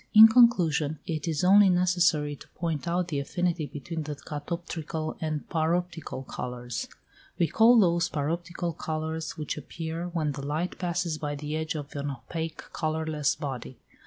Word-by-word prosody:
In 220 +1 +12
conclusion 175 - +4
it 160 -3 -3
is 160 0 0
only 195 +2 +7
necessary 175 -5 +2
to - - -14
point 165 -2 -2
out 175 +1 0
the 145 -3 -1
affinity 170 +2 -1
between 160 +4 -5
the 150 -1 -4
catoptrical 155 +1 -4
and 155 -2 -2
paroptical 165 -3 -1
colours. 125 -1 -5 0.5
We 170 - +3
call 225 +8 +6
those 170 -3 +3
paroptical 170 +3 -2
colours 160 0 -3
which 150 -1 -3
appear 165 +3 -5
when 165 -4 -1
the 140 0 -6
light 155 +5 -2
passes 175 -3 -1
by 145 -1 -2
the 150 +1 -4
edge 160 0 -2
of 145 -1 -6
an 145 0 -2
opaque 160 +3 -5
colourless 155 -2 0
body. 130 -3 -5
160 Hz, 155 wpm, -28 LUFS, 150-175 Hz, 0.5 s, In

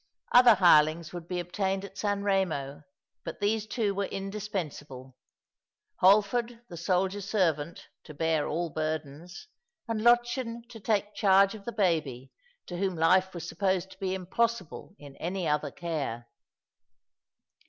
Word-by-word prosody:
Other 245 -2 +8
hirelongs 165 -3 +4
would 175 -1 -7
be 180 0 -3
obtained 190 +2 -2
at 195 -1 -12
San 205 0 -1
Eemo, 155 -8 -1 0.4
but - - -7
these 215 +1 0
two 215 -2 -1
were 200 0 -1
indispensable 175 -10 -6 0.4
— - - -59
Holford, 215 +5 +3
the - - -8
soldier 185 +4 0
servant, 170 -6 -1 0.2
to 155 - -11
bear 160 -1 0
all 170 +1 -2
burdens, 155 - -5 0.4
and 225 -2 -2
Lottchen 240 0 +2
to 230 -2 -10
take 210 0 -1
charge 195 0 +4
of 210 -2 -11
the 235 - -3
baby, 155 - -1 0.3
to 175 - -6
whom 190 -1 -1
life 185 +3 +3
was 170 -1 -6
supposed 190 -1 -1
to - - -15
be 190 -1 -2
impossible 195 0 -2
in 145 -2 -13
any 180 0 -3
other 150 -1 0
care. 140 -9 -4
185 Hz, 145 wpm, -28 LUFS, 160-205 Hz, 0.4 s, Other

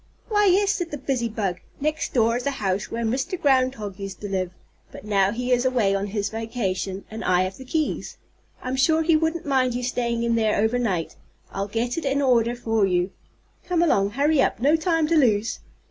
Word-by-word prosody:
"Why, 415 -2 +3
yes," 395 +2 +4
said 350 -5 -2
the 295 - -5
busy 260 -3 -1
bug. 195 -5 -2 0.2
"Next 305 +2 -1
door 230 -2 +2
is 250 +3 -2
a 280 - -2
house 190 -1 -1
where 235 +1 -3
Mr. 265 +10 -1
Groundhog 255 - +1
used 195 -1 -6
to 205 - -4
live. 190 -2 -1 0.4
But - - -11
now 200 -2 +2
he 250 +3 -3
is 245 0 +3
away 245 -7 +2
on 195 +1 -1
his 205 0 -2
vacation, 200 -4 -3
and 220 +1 -6
I 180 0 +3
have 185 +1 -4
the 260 - -10
keys. 310 +3 -2 0.5
I'm 255 +1 -2
sure 315 +4 +3
he 325 0 +3
wouldn't 320 +1 0
mind 260 -3 +1
you 250 - -3
staying 235 -1 -1
in 235 0 +1
there 220 -2 +2
over 220 +4 +2
night. 185 -9 -2 0.3
I'll 195 +1 -3
get 235 +7 -2
it 325 - -7
in 275 +1 +1
order 240 -3 +2
for 225 -3 0
you. 180 0 0 0.6
Come 345 -2 +2
along, 200 -12 +3
hurry 295 0 +3
up, - - +1
no 285 +6 +4
time 325 -1 +1
to 330 +2 +1
lose!" 225 -7 +2
240 Hz, 210 wpm, -24 LUFS, 205-280 Hz, 0.6 s, yes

